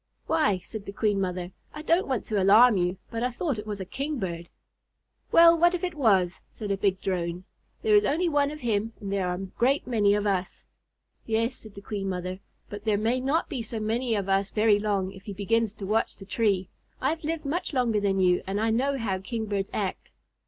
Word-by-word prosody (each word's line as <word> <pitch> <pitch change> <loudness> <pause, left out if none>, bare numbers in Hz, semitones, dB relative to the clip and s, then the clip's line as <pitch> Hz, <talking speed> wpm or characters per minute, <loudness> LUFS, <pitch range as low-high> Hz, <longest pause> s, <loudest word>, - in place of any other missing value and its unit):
"Why," 210 - +2
said 215 -2 -8
the - - -4
Queen 205 -1 0
Mother, 180 -1 -3 0.2
"I 300 - -6
don't 335 +3 +2
want 260 -5 -1
to 210 -3 0
alarm 215 +5 +7
you, 180 0 0
but 230 -1 -3
I 250 - +1
thought 255 -1 -2
it 210 - -8
was 205 -1 -4
a 190 - -4
Kingbird." 190 - -4 0.8
"Well, 335 0 +8
what 345 +2 +4
if 360 - -5
it 360 -1 -1
was?" 195 - +2
said 210 -3 -6
a - - +2
big 190 -1 +1
Drone. 175 -1 -2 0.4
"There 435 -2 +4
is 415 - +6
only 345 +3 +1
one 290 -3 +2
of 300 0 -8
him 225 -1 -1
and 200 -1 -4
there 195 -2 0
are 180 - -1
a 195 +2 -5
great 270 +4 +2
many 210 -5 +3
of 210 0 -1
us." 190 -3 -2 0.6
"Yes," 230 +2 +1
said 220 -4 -9
the 200 - -9
Queen 195 -2 -3
Mother, 185 0 -4 0.3
"but 205 0 -8
there 215 -2 +2
may 230 +5 +1
not 280 +6 0
be 270 -6 -4
so 225 0 -5
many 225 +2 0
of 200 -2 -2
us 195 +1 +1
very 215 -1 +3
long 200 -3 -1
if 190 - -12
he 205 - -5
begins 220 +2 +1
to 200 - -7
watch 220 +3 0
the 195 - -11
tree. 200 -3 +1 0.3
I 265 - +1
have 325 0 -5
lived 315 0 -3
much 320 +6 -2
longer 245 -6 +1
than 195 -1 +1
you 180 -1 +3
and 195 +2 -1
I 225 +1 +1
know 270 +5 +1
how 200 -6 -2
Kingbirds 205 -1 -3
act." 195 -3 -3
215 Hz, 225 wpm, -27 LUFS, 195-255 Hz, 0.8 s, Well